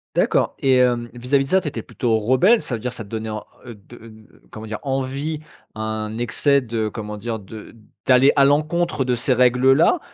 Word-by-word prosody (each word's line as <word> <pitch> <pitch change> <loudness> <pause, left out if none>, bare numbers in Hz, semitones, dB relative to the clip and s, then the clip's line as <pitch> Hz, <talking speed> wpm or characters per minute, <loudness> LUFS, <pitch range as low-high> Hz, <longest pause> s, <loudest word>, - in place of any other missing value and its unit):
D'accord. - - +1
Et 135 -1 +3
hem, 120 -2 +1
vis-à-vis 135 +3 0
de - - -10
ça, 190 - +4
tu 155 - -6
étais 115 -6 -4
plutôt 115 -1 -1
rebelle? 150 - +3
Ça 125 - -3
veut - - -6
dire 125 +2 -4
ça 110 - -7
te 100 - -16
donnait 110 -1 -5
en 110 - -7 0.2
heu, 120 - -8
de, 105 +3 -16
heu, 110 -2 -17
comment 110 0 -9
dire? 105 0 -4
Envie, 135 +3 -3 0.3
un 110 0 -4
excès 140 +4 +2
de 115 -3 -3
comment 105 -1 -6
dire? 115 +1 -4
De 105 +3 -12 0.3
d'aller 130 +2 +5
à 140 -1 +5
l'encontre 155 +1 +1
de 125 -1 +1
ces 125 +2 +1
règles-là? 130 - +4
125 Hz, 205 wpm, -21 LUFS, 110-135 Hz, 0.3 s, d'aller